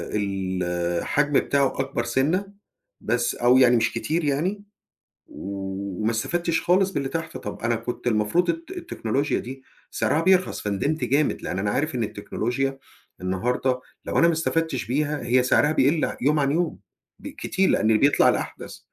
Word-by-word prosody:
الحجم 95 +6 -1
بتاعه 140 -1 +2
أكبر 135 -3 -1
سِنّة 155 +12 0 0.5
بس 120 0 0
أو 120 +1 +4
يعني 125 -2 +6
مش 115 0 +1
كتير 155 +8 -1
يعني 175 +9 -1 0.6
وما 100 +2 -4
استفدتش 165 +8 -1
خالص 185 +3 +3
باللي 140 -6 -2
تحت، 165 +2 -4
طَب 105 - -7
أنا 115 0 +1
كنت 115 +2 -5
المفروض 110 +11 +1
الت 335 +2 -3
التكنولوجيا 145 - -2
دي 130 +2 -8 0.3
سِعرها 160 - +1
بيرخَص، 185 +1 +2
فندمت 105 +10 -1
جامد 145 +2 +1
لأن 90 - -3
أنا 100 +1 0
عارف 145 +5 -1
إن 120 - 0
التكنولوجيا 125 +6 -3 0.4
النهارده 125 +7 -1 0.2
لو - - -2
أنا 170 - +6
ما 170 - +3
استفدتش 160 -3 -1
بيها 150 +2 -1
هي 125 +1 +3
سعرها 145 +4 +3
بيقِل 150 +1 +2
يوم 150 +4 +3
عن 140 -1 +2
يوم 165 +1 -1 0.4
ب - - -9
كتير 190 0 -1
لأن 110 0 +3
بيطلَع 140 +5 +4
الأحدث. - - -3
135 Hz, 150 wpm, -24 LUFS, 110-160 Hz, 0.6 s, يعني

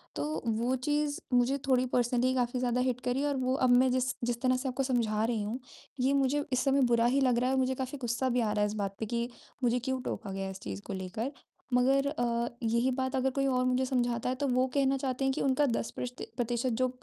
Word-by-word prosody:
तो, 150 +3 -3
वो 230 +3 +1
चीज़ 295 +2 -1
मुझे 250 +3 +3
थोड़ी 255 -1 +3
पर्सनली 245 +1 +2
काफ़ी 250 0 0
ज़्यादा 250 0 +1
हिट 250 -1 0
करी 250 +3 0
और 285 -1 0
वो 255 0 0
अब - - +2
मैं 250 +1 +5
जिस 255 +1 +1
जिस 235 0 -2
तरह 255 -1 +3
से 265 +1 -2
आपको 255 +2 -1
समझा 230 -5 +1
रही 230 -2 0
हूँ, 220 +5 -3 0.4
ये 265 +2 +2
मुझे 280 +1 +1
इस 255 - +2
समय 275 0 +3
बुरा 230 0 +4
ही 265 +3 +3
लग 250 -2 +3
रहा 250 - +1
है - - +1
और 265 - +2
मुझे 260 0 +1
काफ़ी 260 +2 -4
गुस्सा 245 +2 0
भी 250 0 +1
आ 215 -2 0
रहा 210 0 0
है 210 - +3
इस 210 - -4
बात 195 0 -4
पे 220 - -2
कि 235 +2 -2 0.3
मुझे 245 +1 +3
क्यों 260 +1 -2
टोका 200 -4 -4
गया 195 0 -3
इस 190 - -8
चीज़ 100 -1 -6
को - - -5
लेकर। 190 +8 -4 0.4
मगर 270 +3 +3
अ, 240 -4 0 0.2
यही 235 +3 +2
बात 260 +1 -1
अगर 265 0 +2
कोई 275 - +1
और 255 -1 +2
मुझे 255 +1 +2
समझाता 245 -2 0
है 255 - 0
तो 280 - +2
वो 255 0 +2
कहना 275 -1 +2
चाहते 265 0 -2
हैं 270 - +2
कि - - -2
उनका 275 +2 +3
10% 230 -3 -1
प्रष्ट 250 0 -5 0.2
प्रतिशत 240 +1 0
जो 255 - +4
250 Hz, 255 wpm, -30 LUFS, 235-265 Hz, 0.4 s, मैं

